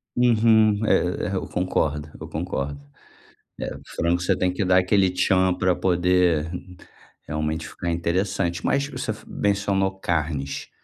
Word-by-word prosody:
Uhum, 110 -3 +4
é 90 -4 +1
é, - - -1
eu 95 - -3
concordo, 75 -5 -1
eu - - -6
concordo, 70 +1 -3 0.8
eh, - - -3 0.2
frango, 85 +1 -1
você 90 - +2
tem 90 - +1
que 95 - -1
dar 90 0 +4
aquele 95 +1 +3
tchan 95 0 +2
pra 90 0 +1
poder 90 -3 +2 0.8
realmente 75 +1 -2
ficar 85 +3 -4
interessante. 85 +1 -1
Mas 140 0 +1
você 130 -5 -4
f 110 - -9
mencionou 100 -1 0
carnes. 75 -6 -2
90 Hz, 140 wpm, -24 LUFS, 85-100 Hz, 0.8 s, Uhum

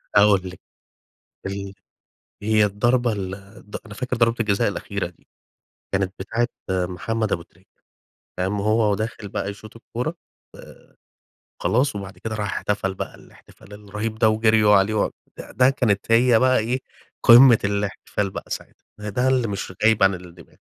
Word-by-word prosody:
هاقول 100 -2 +6
لِك 90 - -12 0.9
ال 100 0 -5 0.7
هي 110 0 +3
الضربة 120 +4 +1
ال 95 -3 -4 0.4
ض - - -4
أنا 105 - -10
فاكر 125 +1 -3
ضربة 115 0 +3
الجزاء 100 -3 +2
الأخيرة - - -3
دي، - - -16 0.7
كانت 95 -1 0
بتاعة 115 +5 -1 0.2
محمد 95 +4 -1
أبو 85 - 0
تريكة، 90 +3 -22 0.7
قام 95 +2 -1
وهو 110 +1 +2
وداخل 110 0 -4
بقى 100 - -3
يشوط 110 +2 -12
الكورة 125 +8 -4 0.4
آآ، - - -16 0.6
خلاص 125 -1 +1
وبعد 100 -1 -7
كده 110 -1 -5
راح 105 -2 -2
احتفل 100 -2 -1
بقى - - -6
الاحتفال 105 -2 -18
الرهيب 105 +2 -5
ده 110 -1 +4
وجريوا 110 -1 +4
عليه 100 +2 +3
و 105 - +1 0.4
ده 130 +1 +5
كانت 115 -5 0
هي 115 0 +5
بقى 130 0 +4
إيه 120 +4 -1 0.4
قمة 120 0 +8
الاحتفال 100 0 -2
بقى - - -7
ساعتها، - - -7
ده 105 0 -5
ده 125 +5 0
اللي 130 -3 +2
مش 100 -2 -5
غايب 110 -2 +4
عن 95 0 +5
الدماغ. 90 -2 -12
105 Hz, 155 wpm, -23 LUFS, 100-115 Hz, 0.9 s, قمة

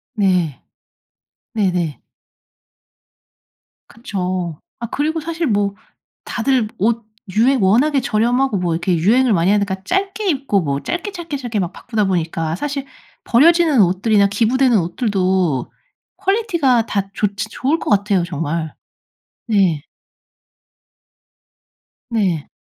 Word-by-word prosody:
네. 180 - +1 1.0
네네. 180 -7 0 1.9
그쵸. 185 -7 -4 0.2
아 235 - -4
그리고 310 +6 -1
사실 330 0 -2
뭐 205 -2 0 0.5
다들 245 -2 0
옷 230 +2 0 0.3
유행 250 +1 +4
워낙에 265 +9 +3
저렴하고 240 +1 +1
뭐 175 -2 -1
이렇게 175 +2 0
유행을 235 +8 +3
많이 175 +2 +3
하니까 200 -2 +1
짧게 390 +2 -1
입고 270 - +1
뭐 140 -2 -2
짧게, 360 +4 -3
짧게, 335 -6 -5
짧게 240 -5 -3
막 180 -2 -2
바꾸다 220 -4 -2
보니까 165 -3 -1
사실 285 0 -3 0.4
버려지는 315 0 +4
옷들이나 200 +3 +3
기부되는 235 +4 +2
옷들도 185 - 0 0.5
퀄리티가 340 - +1
다 195 -2 -2
좋지 205 0 -2
좋을 285 +8 -1
것 - - -4
같아요 200 -3 +2
정말. 165 -1 -3 0.7
네. 185 -9 +1 2.2
네. 185 -9 0
210 Hz, 235 characters per minute, -19 LUFS, 180-265 Hz, 2.2 s, 유행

